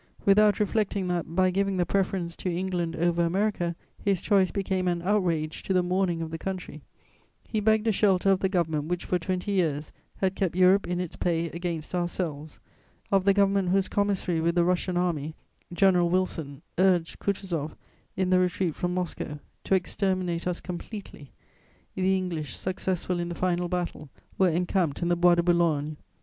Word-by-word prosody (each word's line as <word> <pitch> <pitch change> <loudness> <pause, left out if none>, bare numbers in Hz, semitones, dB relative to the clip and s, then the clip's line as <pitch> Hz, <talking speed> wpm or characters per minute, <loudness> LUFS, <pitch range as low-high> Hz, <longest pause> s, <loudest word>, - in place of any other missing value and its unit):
Without 205 +1 +5
reflecting 205 -2 0
that, 170 -2 -2
by 185 0 +3
giving 195 0 0
the 175 - +2
preference 185 -2 -1
to 185 - -3
England 175 -2 -2
over 170 +1 +1
America, 175 -1 0 0.2
his 195 -3 +1
choice 195 -2 +3
became 190 -2 -1
an 175 -1 0
outrage 175 -6 0
to 190 - -2
the 180 -1 +3
mourning 180 -2 0
of 160 - -6
the 165 - -5
country, 185 -5 -5 0.7
he 220 - -1
begged 220 +1 +2
a 225 - +3
shelter 195 -2 +3
of 190 - +3
the 190 - +1
government 160 -5 0
which, 175 +2 -3
for 180 - 0
twenty 185 +3 -2
years, 155 -6 0 0.3
had 190 -1 0
kept 190 -3 -1
Europe 185 +1 +4
in 180 0 -1
its 180 -3 -4
pay 170 -1 -1
against 170 -2 -4
ourselves, 170 -4 -3 0.5
of 195 -1 +3
the 200 - +5
government 195 -2 +3
whose 190 +1 +2
commissary 195 -5 0
with 170 +1 +1
the 175 - +4
Russian 180 0 0
Army, 160 -4 -1 0.4
General 180 -1 +3
Wilson, 165 -6 -2 0.2
urged 180 -3 +2
Kutuzoff, 180 -6 -2 0.4
in 185 -1 +1
the 185 - +5
retreat 180 -2 0
from 180 +3 -2
Moscow, 175 -4 -3 0.3
to 195 - +3
exterminate 185 -2 -1
us 180 -1 -1
completely: 180 - -8 0.6
the 190 0 +2
English, 165 -8 -4
successful 185 -1 -2
in 175 0 -2
the 175 - -4
final 180 -1 0
battle, 175 -4 -3 0.3
were 190 -1 +5
encamped 175 -2 0
in 170 - 0
the 175 - +3
Bois 175 0 +5
de 170 - +1
Boulogne. 160 -4 +1
180 Hz, 175 wpm, -27 LUFS, 170-190 Hz, 0.7 s, Without